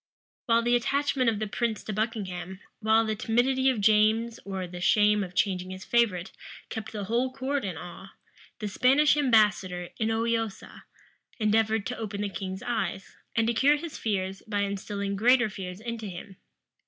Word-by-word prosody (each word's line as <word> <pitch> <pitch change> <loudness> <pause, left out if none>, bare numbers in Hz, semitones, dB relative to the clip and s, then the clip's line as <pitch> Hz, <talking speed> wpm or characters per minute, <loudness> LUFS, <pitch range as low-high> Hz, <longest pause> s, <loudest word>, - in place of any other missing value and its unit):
[] - - -83
While 230 0 +4
the 240 +1 +3
attachment 270 0 +1
of 220 - -1
the 215 - -2
prince 220 +1 -2
to 215 - -4
Buckingham, 190 -4 -3 0.2
while 220 +1 +3
the 220 0 -1
timidity 260 +5 +2
of 255 -4 0
James 215 +2 +3
or 190 -2 -4
the 175 0 -8
shame 210 +2 +4
of 180 -1 -8
changing 185 -1 0
his 185 +1 -8
favorite, 205 -7 +1 0.4
kept 220 - -6
the 210 -2 -4
whole 240 +6 0
court 270 +1 -2
in 185 -5 -4
awe, 175 +3 -9 0.5
the 215 - -4
Spanish 270 +9 +4
ambassador, 210 -9 +2
Inoiosa, 225 -1 -2 0.5
endeavored 220 -1 +2
to 245 - -4
open 205 -2 -4
the 205 - -1
king's 190 0 -5
eyes, 220 -5 -3 0.2
and 225 -1 +3
to 235 - +1
cure 275 +5 +4
his 330 0 -7
fears 195 -3 -2
by 205 -2 -1
instilling 200 0 -3
greater 240 +1 +4
fears 185 -1 -7
into 230 -1 -5
him. 190 +1 -9
215 Hz, 170 wpm, -27 LUFS, 195-235 Hz, 0.5 s, While